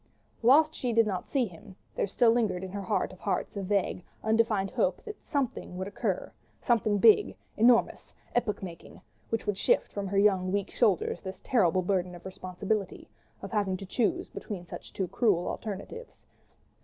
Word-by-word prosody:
Whilst 300 +7 +5
she 245 -2 -2
did 230 0 +5
not 190 -4 -3
see 265 -4 +1
him, 190 0 -12 0.2
there - - -1
still 230 +4 +4
lingered 210 -6 0
in 190 - -6
her 200 +1 -4
heart 190 - -1
of - - -15
hearts - - -2
a 200 - -3
vague, 195 -2 0 0.2
undefined 220 -3 +2
hope - - 0
that 430 -2 -8
"something" 265 - -3
would 190 +1 -3
occur, 200 - -3 0.3
something 220 -4 +2
big, 215 +1 +5 0.2
enormous, 235 +1 +3 0.2
epoch 215 -5 0
making, 170 -3 -9 0.3
which 225 - -2
would 205 -2 -1
shift - - +2
from 200 -1 -3
her 195 +1 -1
young, 190 -2 +3
weak 200 0 -1
shoulders 210 -7 +1
this 190 -1 -7
terrible 185 -7 +2
burden 180 -1 0
of 175 - -13
responsibility, 190 +1 -4 0.3
of - - -6
having 200 -4 0
to 195 - -8
choose 215 +4 0
between 185 -5 -7
two - - -28
such 190 -3 -5
cruel 205 -8 +2
alternatives. 220 - -6
200 Hz, 175 wpm, -29 LUFS, 185-230 Hz, 0.3 s, Whilst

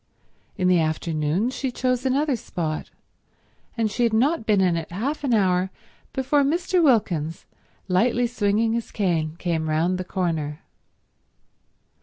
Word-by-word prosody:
In 185 -2 +1
the 180 -1 +4
afternoon 160 +6 0
she 265 0 -3
chose 255 +1 0
another 280 +1 +1
spot; 160 -8 -4 0.9
and 220 -2 +1
she 245 - -3
had 230 -2 +3
not 260 +3 +2
been 210 -2 +4
in 180 -3 +3
it 165 -1 -4
half 265 - -3
an 275 - 0
hour 190 -4 +2 0.4
before 265 +2 +1
Mr. 345 +5 +1
Wilkins, 175 - +1 0.4
lightly 235 +6 +2
swinging 225 -1 +1
his 235 -1 -2
cane, 165 -6 -1
came 165 -3 -1
round 170 +4 +1
the - - -2
corner. 160 -5 -2
200 Hz, 140 wpm, -24 LUFS, 170-245 Hz, 0.9 s, the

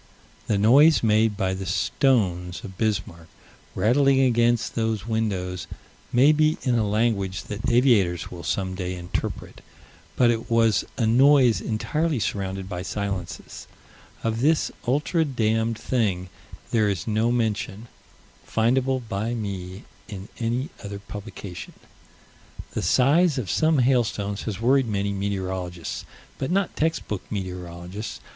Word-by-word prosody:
The 105 - +1
noise 140 +10 +6
made 110 -1 +3
by 95 -2 0
the 95 0 -5
stones 90 - +1
of 95 - -8
Bismarck, 95 -6 -2 0.5
rattling 135 +4 +3
against 120 -2 +2
those 110 -3 -1
windows, 95 -6 -2 0.4
may 135 +5 +6
be 155 0 +2
in 125 - +1
a 110 -3 +1
language 100 -4 0
that 105 +3 -4
aviators 115 -8 +3
will 85 - -8
some 95 +1 -2
day 90 -1 -4
interpret: 90 0 -5 0.5
but 120 -1 +4
it 115 -1 -3
was 115 -2 +3
a 115 - +1
noise 130 +1 +5
entirely 150 +7 -1
surrounded 95 -2 -3
by 90 -2 -5
silences. 100 -1 -5 0.6
Of 115 0 -1
this 155 +3 +2 0.2
ultra 150 +6 +1
damned 115 -5 0
thing, 100 -9 -1 0.4
there 110 -3 +3
is 95 -3 -2
no 110 +2 +1
mention, 110 -2 -2 0.6
findable 125 +2 +1
by 110 +4 -2
me, 95 -3 -5 0.2
in 100 -2 -8
any 120 +5 -1
other 100 0 -5
publication. 100 -2 -8 1.0
The - - -3
size 150 +5 +3
of 120 -7 -2
some 160 -1 +3
hailstones 115 -6 +1
has 100 -2 -5
worried 130 +2 +3
many 100 -1 -1
meteorologists 95 -3 -4 0.3
but 135 - -2
not 195 +1 0
text 160 +1 -1
book 105 -4 -3
meteorologists. 90 0 -6
110 Hz, 130 wpm, -24 LUFS, 95-125 Hz, 1.0 s, noise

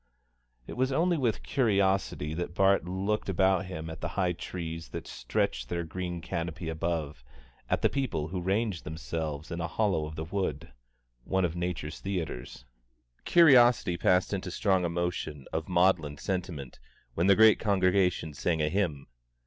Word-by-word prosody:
It - - -7
was 130 +1 0
only 170 +6 +2
with 125 -8 0
curiosity 100 - +1
that 85 +1 -4
Bart 95 -2 +3
looked 95 +4 -2
about 95 0 +2
him 80 -3 -6
at 80 0 -8
the 75 - -1
high 90 -2 +2
trees 85 -1 -6
that - - -6
stretched 60 -1 -2
their 85 0 -2
green 85 +1 -5
canopy 85 0 -4
above, 80 -4 -3 0.5
at - - 0
the - - +6
people 125 - -2
who 90 +1 -3
ranged 95 0 -1
themselves 80 -1 -5
in 85 0 -3
a 85 - -1
hollow 95 -4 0
of 80 - -8
the 80 - -4
wood 80 -6 -3 0.5
one 95 +4 +1
of 85 -1 -3
nature's 85 -3 -3
theatres. 80 -11 -5 0.6
Curiosity 125 - +6
passed 90 +3 +2
into 95 -2 -3
strong 95 -1 +1
emotion 85 -4 -3
of 80 +1 -3
maudlin 85 -5 +2
sentiment 85 -6 -4 0.3
when 85 +7 +1
the 100 - +7
great 110 +1 +6
congregation 95 -5 +2
sang 80 +3 -1
a 75 0 +1
hymn. 80 -7 -1
90 Hz, 155 wpm, -29 LUFS, 80-95 Hz, 0.6 s, the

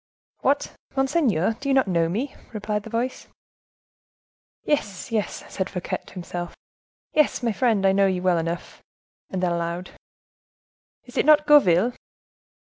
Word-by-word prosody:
"What, 280 +2 +1 0.2
monseigneur, 265 - +1
do 275 - -3
you 270 - +3
not 265 -5 +3
know 170 -3 +2
me?" 245 +10 -2 0.2
replied 210 0 -2
the 225 - -10
voice. 240 +3 -3 1.4
"Yes, 205 -9 -2
yes," 215 -3 -2
said 190 -1 -2
Fouquet 180 -2 -3
to - - -14
himself, 175 -1 -5 0.6
"yes, 300 -4 +2
my 235 - +2
friend, 215 -3 +1
I 190 - +6
know 195 0 +4
you 185 -1 -1
well 180 -2 +3
enough." 170 +1 -5 0.5
And 185 -1 -3
then, 175 - +2
aloud: 170 +1 -3 1.1
"Is 245 - -11
it - - +3
not 300 0 +6
Gourville?" 240 - +5
205 Hz, 145 wpm, -24 LUFS, 180-260 Hz, 1.4 s, I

